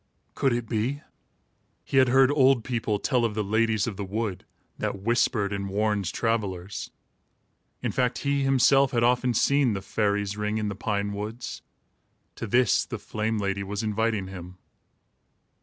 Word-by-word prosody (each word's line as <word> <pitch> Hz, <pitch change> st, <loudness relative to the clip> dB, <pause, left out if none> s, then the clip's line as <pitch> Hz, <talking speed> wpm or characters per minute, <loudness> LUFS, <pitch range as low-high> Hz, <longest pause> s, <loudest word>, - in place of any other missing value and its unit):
Could 135 Hz, -, +1 dB
it 120 Hz, -1 st, -2 dB
be? 125 Hz, +7 st, -2 dB, 0.8 s
He -, -, -1 dB
had 130 Hz, -1 st, +6 dB
heard 130 Hz, +2 st, +5 dB
old 135 Hz, -4 st, +4 dB
people 115 Hz, -4 st, -1 dB
tell 120 Hz, +4 st, +1 dB
of 110 Hz, -3 st, 0 dB
the 105 Hz, -, 0 dB
ladies 110 Hz, +1 st, +1 dB
of 105 Hz, -5 st, -5 dB
the 100 Hz, -, -3 dB
wood, 100 Hz, 0 st, -3 dB, 0.3 s
that 100 Hz, -, -2 dB
whispered 115 Hz, -3 st, +1 dB
and 100 Hz, -1 st, -3 dB
warned 105 Hz, -2 st, 0 dB
travellers. 100 Hz, -5 st, -2 dB, 0.9 s
In -, -, 0 dB
fact, 125 Hz, -1 st, 0 dB
he 140 Hz, 0 st, +1 dB
himself 135 Hz, 0 st, +4 dB
had 120 Hz, -1 st, +2 dB
often 125 Hz, 0 st, +2 dB
seen 140 Hz, -5 st, +3 dB
the 95 Hz, -, -2 dB
"fairies' 100 Hz, -1 st, 0 dB
ring" 105 Hz, +1 st, -2 dB
in 105 Hz, -1 st, -1 dB
the 100 Hz, -, -4 dB
pine 100 Hz, -1 st, -2 dB
woods. 110 Hz, +4 st, -6 dB, 0.8 s
To 115 Hz, -, -4 dB
this, 120 Hz, +1 st, +3 dB
the 120 Hz, -, -6 dB
flame 110 Hz, +2 st, -2 dB
lady 100 Hz, -1 st, -1 dB
was 100 Hz, +2 st, -4 dB
inviting 110 Hz, -1 st, 0 dB
him. 90 Hz, -1 st, -9 dB
110 Hz, 160 wpm, -26 LUFS, 100-120 Hz, 0.9 s, had